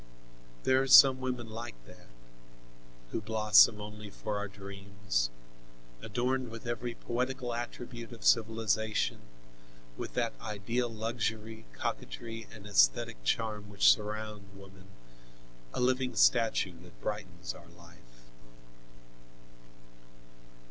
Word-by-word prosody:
There 130 0 +4
are 135 - -1
some 130 0 +9
women 125 -2 -3
like 115 - -6
that, - - -16 1.0
who - - -2
blossom 105 0 +5
only 105 0 -8
for 105 +1 -4
our 105 - -3
dreams, 100 -9 -3 0.7
adorned 125 +3 -1
with 115 +1 -9
every 120 0 -3
poetical 125 0 -2
attribute 120 0 -6
of 115 -3 -10
civilization, 110 -1 +2 0.8
with - - -6
that 120 -2 0
ideal 115 +3 -2
luxury, 110 0 -3
coquetry 115 -1 -5
and 105 -2 -12
esthetic - - +3
charm 105 - -1
which 100 -1 +6
surround 105 -1 -6
woman, 95 -1 -14 0.8
a - - -4
living 130 0 +1
statue 110 -7 +3
that 90 0 -16
brightens 95 -4 -5
our 85 - -14
life. 85 -9 -19
110 Hz, 105 wpm, -31 LUFS, 100-120 Hz, 1.0 s, some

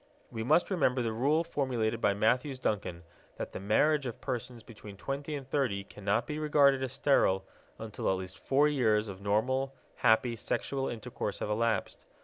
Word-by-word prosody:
We 110 - -4
must 155 - +3
remember 130 -8 +2
the 115 -1 -1
rule 145 +8 +2
formulated 120 -8 -1
by 100 - +3
Matthews 125 +6 +1
Duncan, 95 -8 -2 0.3
that - - -5
the - - -6
marriage 140 +8 +2
of 120 - -6
persons 125 -2 -5
between 105 -3 -12
twenty 140 +6 -4
and 135 -2 -7
thirty 125 -8 0
cannot 100 +3 -1
be 150 0 -4
regarded 145 -3 +4
as 130 -2 -3
sterile 95 -9 +2 0.3
until 110 -2 -3
at 95 - +2
least 95 0 -8
four 140 +2 +3
years 110 -7 +2
of 95 -1 -8
normal, 130 +7 0 0.2
happy 115 0 +3
sexual 135 +4 -2
intercourse 115 -3 -4
have 105 - -3
elapsed. 115 +1 -1
120 Hz, 170 wpm, -30 LUFS, 105-140 Hz, 0.3 s, regarded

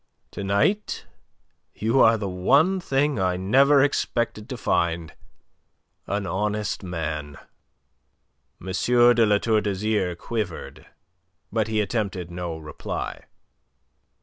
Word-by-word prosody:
To 100 - -6
night 100 - 0 0.7
you 115 +5 +1
are 115 0 +6
the 105 -2 -3
one 140 - +3
thing 140 - 0
I 90 -1 +1
never 135 +9 +4
expected 120 -5 -1
to 130 - -5
find 85 -6 0 1.0
you: - - -3
an 105 -1 -2
honest 105 +4 -2
man." 75 -5 -4 1.2
M. - - -13
de 120 +4 +4
La 105 0 +4
Tour 110 0 +1
d'Azyr 100 -2 -1
quivered. 105 -3 -5 0.6
But 110 -2 0
he 110 -1 +1
attempted 100 -5 -3
no 85 -2 -4
reply. 75 -2 -6
105 Hz, 115 wpm, -24 LUFS, 90-120 Hz, 1.2 s, are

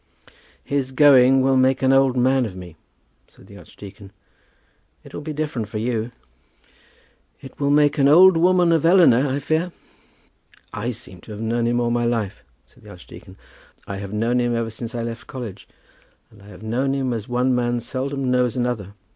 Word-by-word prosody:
"His 140 -2 -2
going 135 -2 +5
will 135 0 +2
make 130 0 +2
an 130 0 +4
old 135 -1 +3
man 130 +1 +2
of 95 - -10
me," 90 -3 -11 0.5
said - - -21
the - - -14
archdeacon. 100 0 -13 0.9
"It - - -15
will - - -6
be 155 +1 -6
different 145 -8 -4
with 105 0 -4
you." 115 -1 -2 1.3
"It 135 - -14
will 140 -1 0
make 145 +1 +2
an 135 - +4
old 180 +5 +7
woman 175 +1 +3
of 165 -3 +2
Eleanor, 165 -7 +4
I 135 +1 -2
fear." 160 +5 -2 1.0
"I 105 +3 -4
seem 105 -7 -9
to 110 - -13
have 105 - -9
known 115 +1 -1
him 120 0 0
all 120 -1 0
my 120 0 0
life," 115 -5 -3 0.2
said - - -25
the - - -15
archdeacon. - - -14 0.5
"I 100 - -6
have 100 0 -7
known 115 +4 0
him 120 -1 0
ever 115 -1 -3
since 115 +2 -7
I 120 - -3
left 115 0 -7
college; 115 -7 -8 0.6
and 105 - -19
I 100 - -17
have 105 +1 -13
known 130 +5 -1
him 130 -2 -2
as 110 -2 -5
one 125 +1 +1
man 120 -1 0
seldom 130 +2 -3
knows 125 -1 0
another. 115 -5 -3
125 Hz, 190 wpm, -21 LUFS, 115-135 Hz, 1.3 s, old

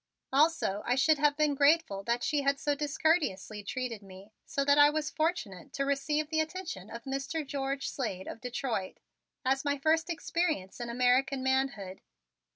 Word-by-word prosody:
Also 280 -9 +2
I 245 - +1
should 300 +3 +3
have 295 0 +3
been 300 -1 +3
grateful 280 -8 +3
that 235 +1 0
she 295 -2 +1
had 280 0 +1
so 290 - +1
discourteously 285 - 0
treated 230 +1 -4
me 195 +1 -13 0.2
so 275 - -1
that 285 +1 +5
I 290 0 +8
was 305 0 -2
fortunate 275 - -2
to 275 - -1
receive 295 +2 0
the 315 - +1
attention 315 - -4
of 235 - -8
Mr. 275 +3 -3
George 275 0 -2
Slade 195 -8 -3
of 225 - -7
Detroit 240 -5 -3 0.5
as 270 +1 +2
my 285 -1 0
first 320 +4 +2
experience 320 - -2
in 240 -1 -4
American 255 +2 +2
manhood. 265 -8 -1
275 Hz, 165 wpm, -30 LUFS, 235-300 Hz, 0.5 s, I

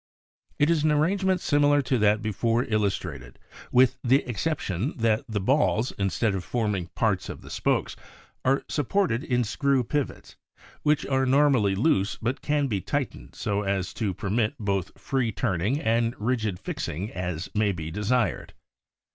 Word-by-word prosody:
It 145 +3 +3
is 160 -3 +2
an 155 - +3
arrangement 185 +4 +2
similar 145 -1 +3
to 130 -1 0
that 105 0 +3
before 115 +3 +1
illustrated 95 - -2 0.3
with 130 +1 +4
the 130 +3 +3
exception 125 - -2
that 110 -2 +2
the 105 -2 -1
balls, 125 +1 +2
instead 100 +2 0
of 95 -2 -3
forming 105 -5 -1
parts - - 0
of - - -8
the - - -11
spokes, - - 0 0.5
are 135 +2 +2
supported 145 - 0
in 125 -4 +1
screw 135 +3 +1
pivots 145 +3 -3
s, - - -28 0.2
which 150 0 +2
are 135 -1 +1
normally 130 -7 +4
loose 100 -3 +1
but 120 +4 -2
can 145 -1 +1
be 105 -8 -1
tight - - -1
ened - - -14
so 100 0 -1
as 95 -2 -2
to 100 -6 -2
permit 110 +1 0
both 100 -4 -2
free 130 -4 0
turning 100 - 0
and 115 -2 +1
rigid 110 -4 -1
fixing 90 +4 -4
as 90 -1 -4
may 105 -1 +2
be 80 -3 -5
desired. 105 +2 -1
115 Hz, 160 wpm, -26 LUFS, 100-135 Hz, 0.5 s, with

